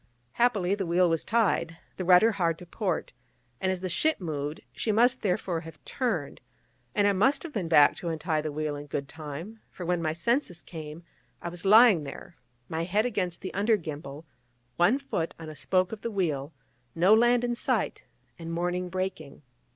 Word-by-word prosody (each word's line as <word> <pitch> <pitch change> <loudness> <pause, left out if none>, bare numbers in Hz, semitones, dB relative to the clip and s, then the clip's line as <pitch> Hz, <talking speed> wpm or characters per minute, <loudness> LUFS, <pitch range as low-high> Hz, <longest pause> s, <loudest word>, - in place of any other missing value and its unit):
Happily, 205 - +2
the 200 -3 -2
wheel 175 +2 +3
was 165 -2 0
tied, 185 -7 +1 0.2
the 185 - -3
rudder 185 +5 +6
hard 170 -5 0
to 180 - -11
port, 180 0 -3 0.5
and 190 - 0
as 185 -1 -3
the 185 - -2
ship 310 - +1
moved, 150 -4 -4
she 220 - -1
must, 245 +4 +3
therefore, 180 -3 -1
have 165 -1 -11
turned; 220 - -2 0.5
and 205 - +3
I 200 - +3
must 265 +9 +2
have 335 -3 -8
been 190 -8 -2
back 150 -3 +6
to 175 - -6
untie 160 -1 -1
the 155 0 -4
wheel 150 0 -2
in 145 0 -8
good 140 -1 -3
time, 160 +8 -8
for 180 - -8
when 175 0 0
my 155 -1 0
senses 180 - -1
came, 160 0 -9 0.4
I 170 - -5
was 175 +2 -8
lying 210 -4 +7
there, 155 +4 -9 0.3
my 160 +1 -2
head 205 +6 +1
against 185 -7 -2
the 190 - -6
under 210 +3 +2
gimbal, 150 -3 -7 0.5
one 190 +10 +4
foot 225 -12 -3
on 160 -1 -8
a 155 - -9
spoke 185 +5 +1
of 220 - -7
the 235 - -3
wheel, 160 -9 -1 0.4
no 180 +5 +5
land 240 +2 +4
in 240 0 0
sight, 240 - -1 0.4
and 165 0 -6
morning 180 +1 -2
breaking. 175 -6 -5
180 Hz, 190 wpm, -28 LUFS, 160-210 Hz, 0.5 s, lying